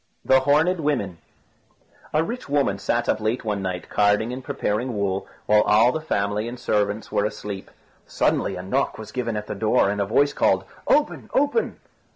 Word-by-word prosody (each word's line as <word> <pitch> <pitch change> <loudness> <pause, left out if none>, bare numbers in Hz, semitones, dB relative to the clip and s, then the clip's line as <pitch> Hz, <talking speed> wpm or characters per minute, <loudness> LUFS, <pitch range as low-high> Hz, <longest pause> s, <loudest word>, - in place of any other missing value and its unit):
THE 130 - +5
HORNED 155 +7 +2
WOMEN 125 - -1 0.9
A 155 +1 +2
rich 235 - -6
woman 140 -9 +1
sat 120 +3 0
up - - +1
late 110 +3 -2
one 105 -2 -1
night 90 -1 -4
carding 105 +3 +2
and 130 +1 -6
preparing 115 +2 -2
wool, 100 -1 -1 0.2
while 105 0 +5
all 110 +4 +4
the 160 - -3
family 105 -6 -1
and 120 +1 -7
servants 105 0 -1
were - - +1
asleep. 105 -2 -5 0.4
Suddenly - - 0
a 90 - -6
knock 130 +9 -1
was 110 -1 -9
given 115 -3 -2
at 105 - -4
the - - -5
door, 105 -1 +2
and 100 0 -2
a - - +1
voice 140 +7 +3
called, - - +2 0.2
"Open! 295 0 +1
open!" 290 - +1
110 Hz, 185 wpm, -23 LUFS, 100-135 Hz, 0.9 s, THE